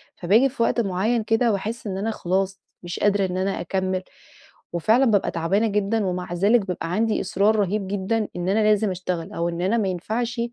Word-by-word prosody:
فباجي 220 +10 +3
في 240 -3 -1
وقت 235 - +2
معيّن 215 +4 0
كده 225 +2 +2
وأحس 220 +3 -4
إن 190 -1 -3
أنا 215 +3 -1
خلاص 190 -1 -2 0.2
مش 175 0 -5
قادرة 205 -1 +2
إن 185 0 -3
أنا 190 +1 -1
أكمل، 185 -1 -2 0.7
وفعلًا 220 +10 +3
بابقى 210 -4 +2
تعبانة 190 +7 +1
جدًا، 210 0 0
ومع 180 -1 -3
ذلك 200 +4 +3
بابقى 175 -2 -4
عندي 220 +3 +1
إصرار 205 +2 +2
رهيب 205 0 0
جدًا 205 +3 -1
إن 175 +1 -2
أنا 205 - +2
لازم 210 -1 +2
أشتغل، 180 -2 -4
أو 170 +1 -1
إن 170 0 -4
أنا 195 +6 +1
ما 210 - +1
ينفعش 225 +6 -2
195 Hz, 195 wpm, -23 LUFS, 185-220 Hz, 0.7 s, فباجي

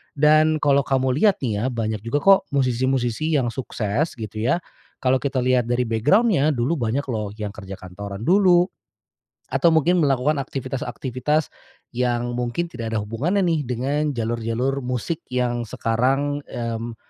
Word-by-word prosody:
Dan 155 +2 +4
kalo 140 -1 +4
kamu 130 -1 +1
lihat 210 -3 +5
nih 110 -5 -1
ya, - - -1
banyak 110 -4 -2
juga 115 +7 -2
kok, 195 -1 +7 0.2
musisi-musisi 130 +3 +1
yang 125 -5 +1
sukses 120 +3 -2
gitu 110 -2 -6
ya, 120 +8 +2 0.5
kalo 130 0 +3
kita 135 -2 -1
lihat 125 -2 +2
dari 120 +1 +1
background-nya, 150 - +2
dulu 130 +7 0
banyak 120 +4 0
loh, 110 -2 -2
yang 105 -2 -5
kerja 95 -2 -8
kantoran 100 +3 -8
dulu, 180 - +5 0.9
atau 170 - +4
mungkin 165 +3 +3
melakukan 140 +1 +1
aktivitas-aktivitas 135 +2 -2 0.4
yang 120 0 -1
mungkin 125 +8 -2
tidak 115 -8 -6
ada 110 - 0
hubungannya 155 - 0
nih 165 -3 +1
dengan 140 +4 -1
jalur-jalur 120 +4 -1
musik 125 +6 -3
yang 125 -1 0
sekarang, 135 +7 0
mmm, 115 -1 -4
125 Hz, 145 wpm, -22 LUFS, 115-145 Hz, 0.9 s, kok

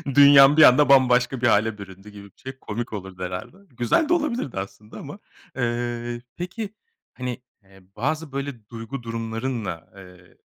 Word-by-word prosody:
Dünyan 140 0 +8
bir 155 - +8
anda 145 +2 +6
bambaşka 125 -1 +4
bir 125 - +3
hâle 110 0 +2
büründü 95 0 -12
gibi 105 -1 -12
bir 100 - -20
şey 135 - -8
komik 115 0 -5
olurdu 95 -3 -7
herhâlde. 90 - -6 0.2
Güzel 120 - +1
de - - +4
olabilirdi 255 - -2
aslında 100 +3 -9
ama, 145 +9 -9 0.4
eee, 120 -1 -3 0.2
peki, 195 +4 -6 0.4
hani, 125 -1 -5 0.2
eee, 95 0 -20
bazı 155 +6 -2
böyle 135 -6 -6
duygu 115 +2 -7
durumlarınla, 115 -5 -4
eee, 90 -2 -16
120 Hz, 155 wpm, -23 LUFS, 105-140 Hz, 0.4 s, Dünyan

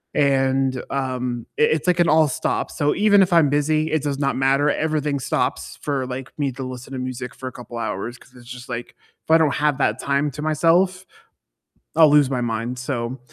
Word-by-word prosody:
and, 135 -2 +2
um, 125 -3 -3
it 150 - +4
it's 155 +1 -2
like 180 -1 +2
an 170 - +4
all-stop, 155 -3 +1
so, 145 0 0
even 205 0 +5
if 185 -1 +2
I'm 165 -4 +5
busy, 155 +2 +1
it 155 -1 +1
does 140 -1 -2
not 140 -1 0
matter, 135 +2 +2
everything 150 -2 -1
stops 125 - -2
for, 140 -3 -2
like, 130 0 -6
me 140 -2 0
to 135 +1 -6
listen 130 +1 -8
to 130 - -4
music 125 0 -5
for 130 - -7
a - - -5
couple 120 -1 -9
hours 115 +2 -4
'cause 130 - -21
it's 120 -1 -15
just 125 0 -9
like 120 -1 -6 0.3
if - - -34
I 160 - +8
don't 155 -3 +2
have 150 -2 +1
that 110 -2 +1
time 140 +1 0
to 150 - -8
myself, 175 +5 +2 0.9
I'll 160 -2 +7
lose 145 -2 +5
my 125 -2 -1
mind, 115 +2 -3
so, 125 -1 -3
140 Hz, 205 wpm, -22 LUFS, 125-150 Hz, 0.9 s, I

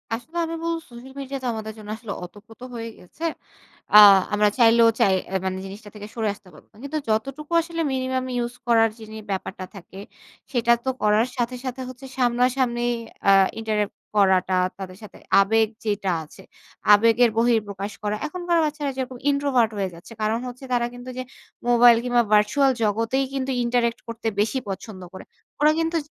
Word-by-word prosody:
আসলে 245 +9 -6
আমি 330 0 -4
বলবো 335 0 -1
সোশ্যাল 245 +2 -12
মিডিয়া 275 0 -5
তো - - -2
আমাদের 220 -1 -6
জন্য 210 -1 -11
আসলে 225 -3 -8
অতপ্রত 210 +6 -13
হয়ে 230 0 -5
গেছে। 180 - -13 0.7
আ - - +10 0.4
আমরা 210 0 +4
চাইলেও 230 -1 +6
চাই 195 - +4 0.2
অ্যা 190 - 0
মানে 190 0 -2
জিনিসটা 205 +2 -10
থেকে 210 0 -8
সরে 225 -2 -1
আসতে 200 -1 -19
পারবো 150 - -17
না। - - -20
কিন্তু 285 +2 -3
যতটুকু 275 +8 -2
আসলে 330 0 -4
মিনিমাম 260 0 -1
ইউস 240 0 -2
করার 225 -1 +4
যিনি 220 0 -9
ব্যাপারটা 190 0 -4
থাকে 190 0 -11 0.5
সেটা 235 -2 +3
তো - - +1
করার 210 +3 +3
সাথে, 245 +1 -1
সাথে, 260 0 -4
হচ্ছে 255 +1 -11
সামনাসামনি 245 0 +1 0.5
আ - - +8 0.3
interact 215 -2 -1 0.2
করাটা 190 -2 +3 0.2
তাদের 185 -1 -8
সাথে 210 - -12 0.2
আবেগ 220 +2 +3 0.2
যেটা 205 -2 -1
আছে, 155 +5 -15 0.5
আবেগের 230 +3 +5
বহিঃপ্রকাশ 210 -4 0
করা। 210 0 -1
এখনকার 350 +1 -1
বাচ্চারা 295 -2 -2
যেরকম 260 -1 -4
introvert 275 -5 +2
হয়ে 195 -2 -1
যাচ্ছে। 170 +7 -13
কারণ 215 +2 0
হচ্ছে 250 +2 -9
তারা 240 -1 +2
কিন্তু 245 +1 -9
যে 255 - -3 0.4
মোবাইল 240 -1 +7
কিংবা 245 -1 +2
ভার্চুয়াল 210 +7 +4
জগতেই 230 +6 +1
কিন্তু 270 -1 -2
interact 235 -1 0
করতে 230 0 -5
বেশি 220 +6 +1
পছন্দ 195 0 -7
করে। - - -9 0.4
ওরা 300 +1 +6
কিন্তু 330 +1 0
230 Hz, 170 wpm, -23 LUFS, 210-260 Hz, 0.7 s, আ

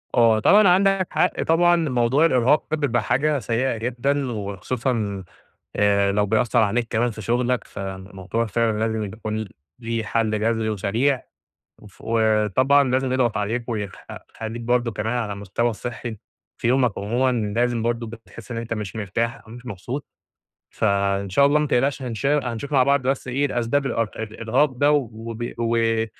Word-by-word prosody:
آه 115 -2 +5
طبعًا 205 - +6
عندك 190 0 +3
حق - - +1
طبعًا، 175 +2 +4
موضوع 135 -2 +2
الإرهاق 130 0 +3
ده 155 - +1
بيبقى 115 - 0
حاجة 150 +2 +1
سيئة 120 +1 -1
جدًا، 125 +4 -1
وخصوصًا، 105 0 -3 0.5
آآ، 100 -1 +3
لو 105 +1 +1
بيأثّر 110 +3 +1
عليك 115 +2 +2
كمان 120 +2 +1
في 110 -1 -8
شغلك، 120 +3 0
فالموضوع 95 +3 -5
فعلًا 110 0 0
لازم 110 0 -1
يكون 110 +1 -5 0.3
ليه 115 -2 -3
حل 110 -1 0
جذري 115 0 0
وسريع، 115 +7 0 0.6
وف 105 -2 -17
وطبعًا 110 +5 +3
لازم 130 0 +1
يضغط 125 -3 +1
عليك، 115 +4 -2
ويخ 105 -5 -3 0.4
يخلّيك 115 +1 -5
برضه 120 0 +1
كمان 110 +2 -2
على 110 -4 -2
المستوى 100 +4 -1
الصحّي- 120 0 -6 0.4
في - - 0
يومك 125 -3 +2
عمومًا- 120 +6 +1 0.3
لازم 120 -1 +1
برضه 115 0 -1
بتحس 115 -1 -12
إن 120 - -4
أنت 115 0 -3
مش 105 -1 -5
مرتاح 115 +4 -2
أو - - -14
مش 120 +1 -11
مبسوط، 120 +7 -5 0.7
فإن 100 -1 0
شاء 140 +10 +4
الله 145 +2 +4
ما 150 - 0
تقلقش 135 +2 +1
هنش 120 -1 -4
هنشوف 140 -2 -1
مع 135 -3 +5
بعض 140 +1 +3
بس 130 +1 -1
إيه 135 +3 0
الأسباب 135 +1 0
الأرق 115 -4 -2
الإرهاق 115 +6 0
ده، 145 +3 +2
وب 115 -3 -3
و 115 -1 +1
115 Hz, 160 wpm, -23 LUFS, 110-130 Hz, 0.7 s, طبعًا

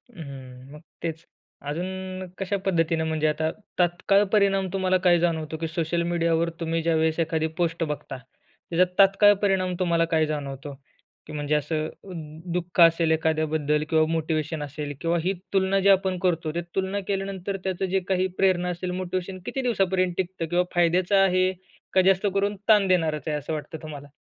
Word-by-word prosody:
हं, 135 -5 -10
मग 150 - -11 0.2
तेच, 165 -1 -4 0.4
अजून 185 +3 -4
कशा 195 +1 -1
पद्धतीने, 165 -3 +1
म्हणजे 160 -1 0
आता 155 +1 0 0.3
तात्काळ 180 +3 +3
परिणाम 195 -2 +3
तुम्हाला 185 -1 +2
काय 175 -1 +5
जाणवतो? 160 -2 -1
की 165 +1 -3
सोशल 170 +1 -1
मीडियावर 170 -1 +1
तुम्ही 165 0 -1
ज्यावेळेस 160 0 +1
एखादी 160 -1 0
पोस्ट 170 -1 0
बघता, 150 -3 -5
त्याच्यात 170 +7 -3
तात्काळ 195 +1 +7
परिणाम 190 -3 +1
तुम्हाला 170 -2 +2
काय 160 -1 +4
जाणवतो? 140 -2 -5 0.5
की - - -9
म्हणजे 150 0 -1
असं 155 +1 -1
अ, 195 - -14 0.4
दुःख 180 0 -3
असेल 165 -1 +5
एखाद्याबद्दल 155 -1 +1
किंवा 160 -1 +4
मोटिव्हेशन 160 -1 -1
असेल, 145 0 -5
किंवा 170 0 +1
ही 190 +3 +1 0.2
तुलना 195 0 +2
जी 195 +1 +3
आपण 190 -1 +3
करतो, 165 -3 +1
त्या 170 +2 -2
तुलना 190 +1 -1
केल्यानंतर 195 -1 -3
त्याचं 190 0 -1
जे - - +4
काही 185 -1 +1
प्रेरणा 180 -2 +2
असेल, 180 +1 -3
मोटिव्हेशन 185 +1 -4
किती 270 - -3
दिवसांपर्यंत 190 -7 +1
टिकतं, 185 -2 -2
किंवा 175 +2 +1
फायद्याचं 175 +3 +3
आहे 185 -1 +3 0.4
का? 190 - +5
जास्त 190 +2 +3
करून 200 +1 0
ताण 210 -3 +5
देणारच 165 -4 +1
आहे. 150 -1 0
असं 150 +2 -5
वाटतं 155 +1 -5
तुम्हाला? 145 -3 -8
170 Hz, 165 wpm, -25 LUFS, 160-190 Hz, 0.5 s, तात्काळ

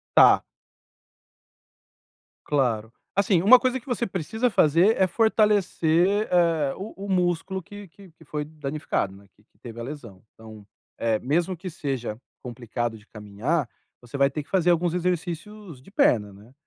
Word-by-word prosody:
tá. - - +7 2.0
Claro, 115 -6 0 0.2
assim, 195 -3 +2
uma 250 +6 +8
coisa 255 0 0
que - - -27
você 245 -2 -1
precisa 200 +7 -1
fazer 175 +3 +4
é 190 - +5
fortalecer, 205 -3 +2
eh, 165 -6 +2
o 200 +4 -8
o - - -8
músculo 185 0 0
que 205 +2 -11
que 190 +1 -17
que 160 0 -20
foi 150 0 -4
danificado, 150 -9 -3
né, 100 +1 -17
que 105 - -28
que - - -38
teve 120 -1 -10
a - - -4
lesão. 120 -8 -9
Então, 110 -2 -13 0.3
eh, 115 -2 +1
mesmo 170 - -1
que 185 +3 -7
seja 135 -9 -4 0.3
complicado 120 -2 -4
de 105 0 -18
caminhar, 115 +8 -3 0.3
você 120 +3 -8
vai 140 0 +3
ter 150 +2 -4
que 145 - -23
fazer 180 -2 +2
alguns 175 0 +1
exercícios 180 -1 -4
de 170 - -17
perna, 105 - +2
né, 105 +6 -17
160 Hz, 160 wpm, -25 LUFS, 120-190 Hz, 2.0 s, uma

